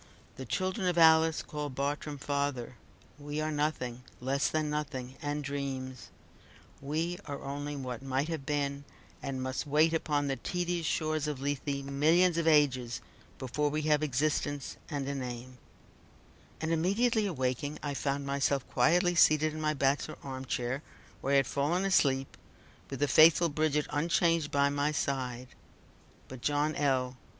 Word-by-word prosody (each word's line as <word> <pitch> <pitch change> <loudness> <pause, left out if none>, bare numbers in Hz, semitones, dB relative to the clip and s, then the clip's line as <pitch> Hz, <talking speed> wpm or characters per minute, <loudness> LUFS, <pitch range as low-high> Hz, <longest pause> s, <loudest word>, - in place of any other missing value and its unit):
The 130 -1 -8
children 185 - -1
of 175 -1 +1
Alice 160 -1 +5
called 150 -3 -5
Bartrum 145 +2 -2
father. 140 -3 -2 0.4
We 145 +1 -4
are 155 0 -1
nothing; 145 -5 -2 0.2
less 135 +2 0
than 155 -1 0
nothing, 140 -4 -4
and 145 0 -2
dreams. 135 -2 -4 0.7
We 160 +6 -2
are 140 -1 -6
only 145 +1 -4
what 125 -3 -5
might 135 +2 -1
have 160 -4 -4
been, 140 0 -1 0.4
and 135 -2 -3
must 130 +3 -3
wait 155 +3 +4
upon 150 -3 0
the 135 -1 -1
tedious 175 -2 -2
shores 155 -1 0
of 150 -3 -3
Lethe 140 0 -2
millions 165 +5 +3
of 165 - 0
ages 130 -6 +3 0.4
before 145 +3 -1
we 155 +1 -2
have 150 -1 +3
existence, 145 0 -1
and 140 -4 -3
a 140 - -2
name" 125 -1 -6 1.0
and 160 +1 -2
immediately 205 +7 +2
awaking, 140 -2 -2
I 145 -1 -2
found 140 0 -2
myself 140 -1 0
quietly 175 +2 +3
seated 155 -2 +4
in 155 - -5
my 155 0 +1
bachelor 140 +2 0
arm 130 -1 -6
chair, 125 +2 -2 0.4
where 140 - 0
I - - +6
had 135 - +4
fallen 160 +7 0
asleep, 135 -8 +2 0.5
with 135 0 -6
the 145 - +3
faithful 165 +4 +6
Bridget 150 0 +1
unchanged 165 +1 +2
by 140 0 +3
my 145 +1 +1
side 130 -3 -2 0.8
but 130 -2 -10
John 150 +2 +1
L. 130 -3 0
145 Hz, 155 wpm, -31 LUFS, 135-155 Hz, 1.0 s, I